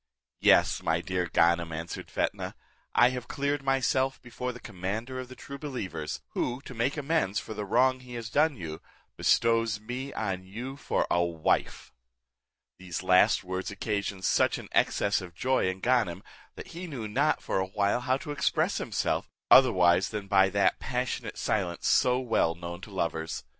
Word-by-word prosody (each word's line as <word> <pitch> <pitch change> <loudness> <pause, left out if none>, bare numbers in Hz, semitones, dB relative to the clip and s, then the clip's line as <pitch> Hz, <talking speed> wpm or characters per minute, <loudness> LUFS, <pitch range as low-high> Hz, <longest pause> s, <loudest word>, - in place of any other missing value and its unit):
"Yes, - - +4
my 80 0 +1
dear 90 0 -2
Ganem," 85 0 +2
answered 80 +1 -6
Fetnah, - - -2 0.4
"I 120 - +6
have 125 -1 -5
cleared 140 +1 -1
myself 135 0 +1
before 125 +1 -4
the 125 - -10
commander 110 +6 -4
of 130 - -6
the 130 - -11
true 140 +1 -9
believers, 110 - -5
who, 125 +1 -2
to 135 - -10
make 125 +6 -1
amends 145 - 0
for 110 - -7
the 105 -1 -4
wrong 130 +5 +3
he 125 -1 -10
has 115 -1 -6
done 150 +1 +2
you, 80 -4 -6 0.3
bestows 115 -1 +2
me 125 +5 -5
on 95 -4 -3
you 120 +8 -7
for 145 - -1
a 85 - +3
wife." 85 -2 -1 0.9
These 95 -1 -5
last 90 +1 +4
words 95 +1 -4
occasioned 100 -2 -3
such - - +3
an - - -10
excess 100 -2 +2
of 90 -2 -10
joy 130 0 +1
in 95 +1 -5
Ganem, 110 -7 +1 0.3
that - - -9
he 175 +2 -7
knew 125 -9 -5
not 140 +8 +1
for - - -1
a 95 - -1
while 100 +3 +1
how 130 +1 +1
to 145 +2 -7
express 145 - +1
himself, - - -1 0.2
otherwise 95 -8 +6
than 105 -2 -4
by 95 -1 +5
that 100 +1 +2
passionate 125 -3 -3
silence 90 -5 -1
so 125 0 +4
well 115 -9 +1
known 85 +1 -7
to - - -10
lovers. 80 -4 -3
110 Hz, 175 wpm, -28 LUFS, 95-130 Hz, 0.9 s, I